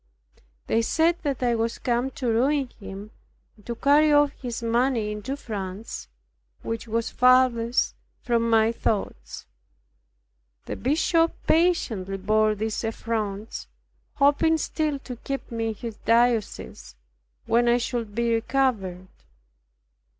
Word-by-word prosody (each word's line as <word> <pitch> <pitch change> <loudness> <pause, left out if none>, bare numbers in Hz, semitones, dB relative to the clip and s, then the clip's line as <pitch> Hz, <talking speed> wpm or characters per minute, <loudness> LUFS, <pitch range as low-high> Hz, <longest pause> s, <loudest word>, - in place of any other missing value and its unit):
They 225 - +2
said 325 +8 +2
that 275 -5 -2
I 240 -1 +2
was 230 0 -1
come 245 +1 0
to 255 - -2
ruin 260 +4 +1
him, 200 +1 -9 0.4
and 210 - -21
to 235 - -3
carry 295 +4 +4
off 290 -1 +5
his 245 -3 -6
money 230 -1 +1
into 210 +7 -4
France, 205 -4 -6 0.6
which 225 +1 -4
was 230 +1 -1
farthest 250 -2 +3 0.3
from 230 -1 +1
my 225 0 +4
thoughts. 200 - -3 1.2
The - - -4
bishop 330 +4 +2
patiently 235 - +1
bore 215 +2 +2
these 220 +2 -3
affronts, 220 -2 -3 0.5
hoping 290 +3 +3
still 305 -2 -1
to 255 -2 -8
keep 275 +2 -5
me 225 -1 -2
in 220 - -3
his 225 0 -7
diocese, 230 - 0 0.5
when 240 +1 +2
I 240 0 +4
should 235 -3 -3
be 235 0 +1
recovered. 225 -7 0
235 Hz, 125 wpm, -25 LUFS, 220-265 Hz, 1.2 s, off